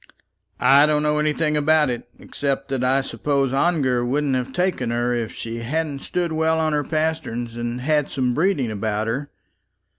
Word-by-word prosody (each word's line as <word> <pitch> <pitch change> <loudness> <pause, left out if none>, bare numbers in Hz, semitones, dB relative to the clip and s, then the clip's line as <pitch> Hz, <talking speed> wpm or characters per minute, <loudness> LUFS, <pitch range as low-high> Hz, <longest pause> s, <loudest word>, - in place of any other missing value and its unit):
"I 140 +2 +6
don't 150 0 +2
know 150 0 +2
anything 150 0 +1
about 150 -1 +3
it, 120 0 -6
except 135 -1 -3
that 135 -2 -1
I 130 +2 +3
suppose 135 -1 -1
Ongar 135 -5 +2
wouldn't 140 +3 0
have 130 0 -1
taken 180 -6 -1
her 120 +1 0
if 115 -2 -2
she 115 0 -6
hadn't 145 +4 -2
stood 175 +3 -2
well 160 0 +1
on 155 -1 +1
her 150 0 +1
pasterns, 155 -7 -2
and 120 +1 -4
had 150 +1 +1
some 125 -2 0
breeding 150 - +1
about 105 0 -2
her. 135 +6 -3
140 Hz, 175 wpm, -22 LUFS, 120-155 Hz, -, I